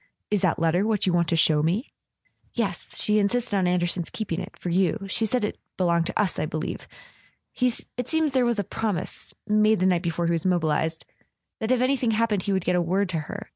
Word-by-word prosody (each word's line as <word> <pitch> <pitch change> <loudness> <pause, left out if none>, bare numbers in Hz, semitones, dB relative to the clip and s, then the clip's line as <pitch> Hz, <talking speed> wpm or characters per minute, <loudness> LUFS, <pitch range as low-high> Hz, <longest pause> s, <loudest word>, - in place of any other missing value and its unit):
"Is 205 -3 +2
that 180 -4 +2
letter 165 +3 +2
what 215 -3 +1
you 185 - +2
want 170 -1 +2
to 170 - +1
show 155 -2 +4
me? 185 - -1 0.3
" - - -58 0.3
"Yes. - - -3
She 210 -1 +3
insisted 225 +2 0
on 190 -2 +2
Anderson's 175 -1 0
keeping 185 -6 -3
it—for 180 - -6
you. 190 +3 +1
She 220 +4 +1
said 245 +1 0
it - - -5 0.2
belonged 170 -2 +2
to - - -3
us, 200 -4 +1
I - - -1
believe... 155 0 -4 0.7
It 250 -1 -2
seems 320 -2 +2
there 260 -1 +2
was 240 -2 +1
a 205 - 0
promise—made 215 +2 0
the 185 - +2
night 180 -2 +3
before 170 -1 -1
he 170 - +1
was 165 -2 0
mobilised—that 165 +4 -2
if 255 -1 +3
anything 255 -2 +1
happened 220 -3 +1
he 200 - -2
would 190 -2 0
get 180 -1 +2
word 190 +3 0
to 170 -3 -1
her... 205 +7 -7
190 Hz, 210 wpm, -25 LUFS, 170-220 Hz, 0.7 s, show